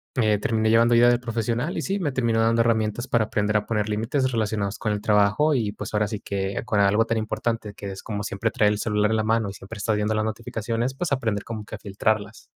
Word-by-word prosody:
eh, 110 Hz, -4 st, +3 dB
terminé 110 Hz, +1 st, +1 dB
llevando 115 Hz, +1 st, +5 dB
ayuda 120 Hz, +1 st, +6 dB
de 120 Hz, -, +3 dB
profesional, 120 Hz, +5 st, -2 dB
y, -, -, -1 dB
sí 195 Hz, +1 st, -1 dB
me 150 Hz, -7 st, -1 dB
terminó 115 Hz, -3 st, +1 dB
dando 115 Hz, +1 st, +3 dB
herramientas 115 Hz, +1 st, 0 dB
para 115 Hz, -2 st, +2 dB
aprender 105 Hz, 0 st, 0 dB
a 105 Hz, -, -2 dB
poner 105 Hz, -2 st, -1 dB
límites 130 Hz, +5 st, 0 dB
relacionados 105 Hz, -3 st, -1 dB
con 105 Hz, -, -1 dB
el 105 Hz, -, -3 dB
trabajo, 105 Hz, +9 st, +3 dB
y, 110 Hz, -5 st, -1 dB
pues, -, -, -7 dB
ahora 105 Hz, 0 st, +2 dB
sí 100 Hz, -1 st, -5 dB
que 95 Hz, 0 st, -3 dB
con 110 Hz, -4 st, 0 dB
algo 100 Hz, +3 st, +4 dB
tan 115 Hz, 0 st, -1 dB
importante, 110 Hz, 0 st, -2 dB
que 100 Hz, -1 st, -6 dB
es 95 Hz, -, -8 dB
como 105 Hz, -2 st, -4 dB
siempre 105 Hz, +2 st, -2 dB
traer 105 Hz, -5 st, +3 dB
el 105 Hz, -, -4 dB
celular 105 Hz, -1 st, +1 dB
en 110 Hz, -, +2 dB
la 110 Hz, -, +1 dB
mano, 110 Hz, -1 st, +1 dB
y 100 Hz, -, -7 dB
siempre 100 Hz, +3 st, -10 dB
estás 105 Hz, +1 st, 0 dB
viendo 105 Hz, +1 st, 0 dB
las 110 Hz, -, +1 dB
notificaciones, 115 Hz, +2 st, -3 dB
pues, 175 Hz, +4 st, -3 dB
aprender 115 Hz, -7 st, 0 dB
como 110 Hz, -2 st, -6 dB
que -, -, -7 dB
a -, -, -10 dB
filtrarlas. 105 Hz, +1 st, -2 dB
110 Hz, 250 wpm, -24 LUFS, 105-115 Hz, -, ayuda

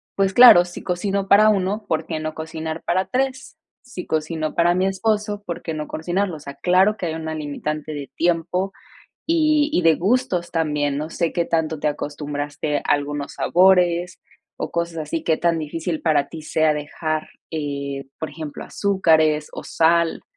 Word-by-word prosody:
pues 195 Hz, -1 st, +1 dB
claro, 240 Hz, -7 st, +9 dB
si 175 Hz, -, -9 dB
cocino 195 Hz, +2 st, -1 dB
para 215 Hz, +2 st, +6 dB
1, 205 Hz, +1 st, 0 dB
¿por 160 Hz, -, -1 dB
qué 160 Hz, -2 st, -4 dB
no 155 Hz, 0 st, -4 dB
cocinar 160 Hz, 0 st, -5 dB
para 185 Hz, +2 st, 0 dB
3? 265 Hz, +4 st, -2 dB, 0.2 s
Si 245 Hz, -8 st, -8 dB
cocino 155 Hz, 0 st, -2 dB
para 175 Hz, +1 st, +3 dB
mi 185 Hz, +1 st, +1 dB
esposo, 210 Hz, +1 st, -1 dB
¿por 170 Hz, -, -5 dB
qué 160 Hz, -, -4 dB
no 150 Hz, -1 st, -5 dB
cocinarlo? 180 Hz, +3 st, -2 dB
O -, -, -9 dB
sea, 140 Hz, -1 st, -9 dB
claro 190 Hz, +4 st, +3 dB
que 180 Hz, -, -3 dB
hay 160 Hz, -, -3 dB
una 160 Hz, -1 st, -4 dB
limitante 150 Hz, 0 st, -4 dB
de 140 Hz, -2 st, -7 dB
tiempo 175 Hz, +3 st, 0 dB, 0.5 s
y 310 Hz, -2 st, +3 dB
y 180 Hz, -, +2 dB
de 165 Hz, -1 st, +5 dB
gustos 195 Hz, -3 st, 0 dB
también, 150 Hz, -3 st, 0 dB
no 155 Hz, +2 st, -4 dB
sé 170 Hz, -1 st, -1 dB
qué 170 Hz, -, +1 dB
tanto 160 Hz, -2 st, -1 dB
te 150 Hz, -, 0 dB
acostumbraste 145 Hz, 0 st, -3 dB
a -, -, -6 dB
algunos 145 Hz, 0 st, -1 dB
sabores 180 Hz, -1 st, +3 dB, 0.4 s
o -, -, -3 dB
cosas 170 Hz, 0 st, -2 dB
así, 155 Hz, +1 st, -3 dB
qué 160 Hz, -1 st, +2 dB
tan 170 Hz, -1 st, +1 dB
difícil 160 Hz, +1 st, -3 dB
para 150 Hz, -4 st, +2 dB
ti 160 Hz, -1 st, -9 dB
sea 155 Hz, 0 st, +1 dB
dejar, 155 Hz, +1 st, -3 dB, 0.2 s
eh, 140 Hz, -3 st, -4 dB
por 160 Hz, -, -4 dB
ejemplo, 150 Hz, -1 st, -7 dB
azúcares 160 Hz, -6 st, +2 dB
o -, -, -7 dB
sal. 170 Hz, 0 st, +2 dB
165 Hz, 175 wpm, -22 LUFS, 155-185 Hz, 0.5 s, claro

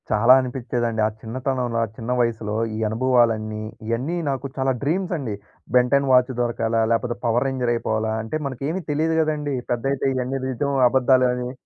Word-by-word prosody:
చాలా 115 Hz, +4 st, +6 dB
అనిపిచ్చేదండి. 120 Hz, -3 st, -2 dB
ఆ -, -, -1 dB
చిన్నతనంలో 125 Hz, 0 st, -2 dB
ఆ -, -, -1 dB
చిన్న 115 Hz, +2 st, -4 dB
వయసులో 110 Hz, -3 st, -1 dB, 0.2 s
ఈ -, -, -4 dB
అనుభవాలన్నీ, 110 Hz, -2 st, +1 dB, 0.2 s
ఇయన్నీ 130 Hz, +10 st, -1 dB
నాకు 135 Hz, 0 st, -3 dB
చాలా 135 Hz, 0 st, +1 dB
డ్రీమ్సండి. 160 Hz, -, -1 dB, 0.4 s
Ben Ten 135 Hz, +2 st, +3 dB
watch 125 Hz, 0 st, +5 dB
దొరకాల? 115 Hz, -1 st, -1 dB, 0.2 s
లేపోతే 120 Hz, +1 st, 0 dB
పవర్ 120 Hz, +3 st, +2 dB
రేంజర్ 130 Hz, -3 st, -1 dB
అయిపోవాలా? 110 Hz, -1 st, -1 dB
అంటే, 110 Hz, -, -5 dB
మనకేవి 140 Hz, +7 st, -3 dB
తెలీదు 160 Hz, +2 st, +1 dB
కదండీ. 150 Hz, -3 st, -1 dB, 0.2 s
పెద్దైతే 135 Hz, +3 st, -1 dB
ఇవన్నీ 130 Hz, +1 st, -2 dB
నిజవో, 140 Hz, +2 st, -1 dB
అబద్ధాలో 130 Hz, 0 st, +4 dB
అని. 125 Hz, 0 st, -4 dB
125 Hz, 150 wpm, -22 LUFS, 115-135 Hz, 0.4 s, చాలా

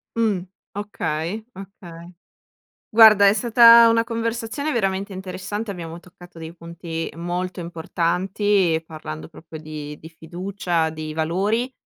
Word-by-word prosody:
Mh, 220 Hz, -5 st, +1 dB, 0.3 s
okay, 200 Hz, -2 st, -4 dB
okay. 180 Hz, -3 st, -12 dB, 0.8 s
Guarda 215 Hz, -3 st, +8 dB
è -, -, +5 dB
stata 235 Hz, 0 st, +7 dB
una 230 Hz, 0 st, +3 dB
conversazione 230 Hz, +5 st, -3 dB
veramente 195 Hz, -3 st, -1 dB
interessante, 190 Hz, +3 st, -5 dB
abbiamo 170 Hz, -3 st, -7 dB
toccato 175 Hz, -1 st, -16 dB
dei 160 Hz, 0 st, -8 dB
punti 170 Hz, -1 st, -6 dB
molto 180 Hz, +2 st, -4 dB
importanti, 175 Hz, +2 st, 0 dB
parlando 80 Hz, -, -8 dB
proprio 160 Hz, -1 st, -11 dB
di 150 Hz, -1 st, -8 dB
di 160 Hz, -, -11 dB
fiducia, 170 Hz, 0 st, -3 dB
di 155 Hz, -1 st, -7 dB
valori 200 Hz, +10 st, -1 dB
180 Hz, 115 wpm, -22 LUFS, 165-210 Hz, 0.8 s, Guarda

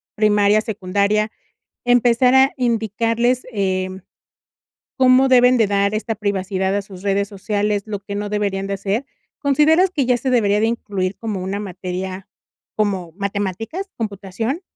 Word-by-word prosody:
primaria, 210 Hz, 0 st, +3 dB
secundaria, 210 Hz, 0 st, 0 dB, 0.5 s
empezar 245 Hz, +1 st, +4 dB
a 265 Hz, +1 st, +5 dB
indicarles, 235 Hz, +1 st, 0 dB
em, 190 Hz, -2 st, -2 dB, 1.0 s
¿cómo 260 Hz, +1 st, +5 dB
deben 250 Hz, -1 st, +5 dB
de 220 Hz, -, +4 dB
dar 200 Hz, +1 st, +1 dB
esta 225 Hz, +1 st, -2 dB
privacidad 195 Hz, -2 st, -1 dB
a 205 Hz, -, +1 dB
sus 190 Hz, -2 st, -12 dB
redes 200 Hz, 0 st, 0 dB
sociales?, 205 Hz, 0 st, -1 dB
lo 205 Hz, -2 st, -4 dB
que 200 Hz, 0 st, -7 dB
no 205 Hz, 0 st, -3 dB
deberían 200 Hz, -2 st, -1 dB
de 200 Hz, -, -2 dB
hacer, 200 Hz, +6 st, -2 dB, 0.4 s
¿consideras 310 Hz, +6 st, +4 dB
que 285 Hz, -8 st, -1 dB
ya 250 Hz, -1 st, +3 dB
se 260 Hz, +2 st, -2 dB
debería 210 Hz, -4 st, +3 dB
de -, -, +2 dB
incluir 200 Hz, -5 st, -2 dB
como 210 Hz, -5 st, -4 dB
una 195 Hz, +2 st, -3 dB
materia, 185 Hz, 0 st, -5 dB, 0.5 s
como 190 Hz, -6 st, -1 dB
matemáticas, 205 Hz, -, -3 dB
computación? 220 Hz, -, -4 dB
210 Hz, 140 wpm, -20 LUFS, 195-235 Hz, 1.0 s, a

